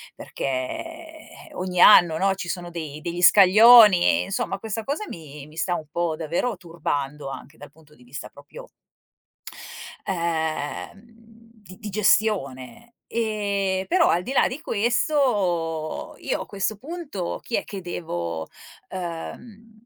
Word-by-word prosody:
perché 315 - -6
ogni 180 -1 -2
anno, 165 -2 +7
no, 195 +2 +2
ci 185 -2 -6
sono 175 -1 -4
dei 155 -3 -7
degli 170 +2 -4
scaglioni. 210 +1 +7
Insomma, 195 - -3
questa 220 0 -5
cosa 290 +9 -3
mi 150 -3 -10
mi 155 +1 -17
sta 175 +1 0
un 155 -3 -6
po' 170 -1 -1
davvero 170 +9 -2
turbando, 150 -5 -4
anche 145 +3 -10
dal 145 -1 -12
punto 150 0 -22
di 125 - -20
vista 140 +6 -8
proprio - - -13 1.4
ehm, 165 0 -3 0.6
di 185 -2 -14
di 215 -2 -6
gestione. 210 - 0
Ehm, 200 -4 -1
però 345 -1 +3
al 175 - +1
di 250 - -6
là - - +4
di 260 +5 -6
questo, 200 - 0
io - - -2
a - - -6
questo 200 +1 -3
punto 280 - -5
chi 235 - -3
è - - -2
che 195 -2 -8
devo, 85 - -5 0.4
ehm, 215 +5 -8
185 Hz, 135 wpm, -24 LUFS, 160-220 Hz, 1.4 s, anno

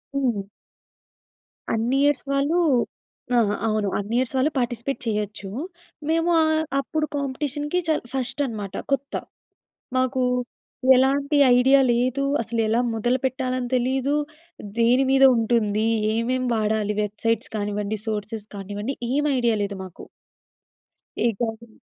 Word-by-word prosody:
హ్మ్. 245 -7 +1 1.3
అన్ని 235 +4 +1
ఇయర్స్ 290 -1 +2
వాళ్ళు 285 +5 +2 0.8
ఆహా! 205 -2 +2
అవును. 215 -2 0
అన్ని 205 +3 -3
ఇయర్స్ 255 +1 0
వాళ్ళు 275 +4 +2
పార్టిసిపేట్ 240 +1 -2
చేయొచ్చు. 210 -2 -3 0.6
మేము 330 +1 +2
ఆహ్, 315 0 +2 0.2
అప్పుడు 305 +3 -1
కాంపిటీషన్‌కి 290 +4 -2
చాల్ 315 -5 +1
ఫస్టన్నమాట 250 -6 -2 0.2
కొత్త. 275 +1 -2 0.8
మాకు 260 0 +1 0.7
ఎలాంటి 280 +3 +2 0.2
ఐడియా 265 +2 +5
లేదు. 255 +3 0 0.2
అసలెలా 225 0 0
మొదలు 240 +3 +1
పెట్టాలని 255 -1 -1
తెలీదు. 265 +3 +1 0.6
దేని 245 +3 +4
మీద 270 0 +5
ఉంటుంది? 220 -2 +1 0.3
ఏమేం 255 +3 0
వాడాలి? 215 -1 0
వెబ్‌సైట్స్ 220 +2 -2
కానివ్వండి, 205 +1 -2
సోర్సెస్ 210 0 -4
కానివ్వండి 205 +6 -4 0.2
ఏమి 295 +2 +1
ఐడియా 235 -2 +2
లేదు 200 -1 -4
మాకు. 185 -2 -11 1.2
ఈ - - +5
గాజులు 225 -1 -4
245 Hz, 110 wpm, -24 LUFS, 215-270 Hz, 1.3 s, ఐడియా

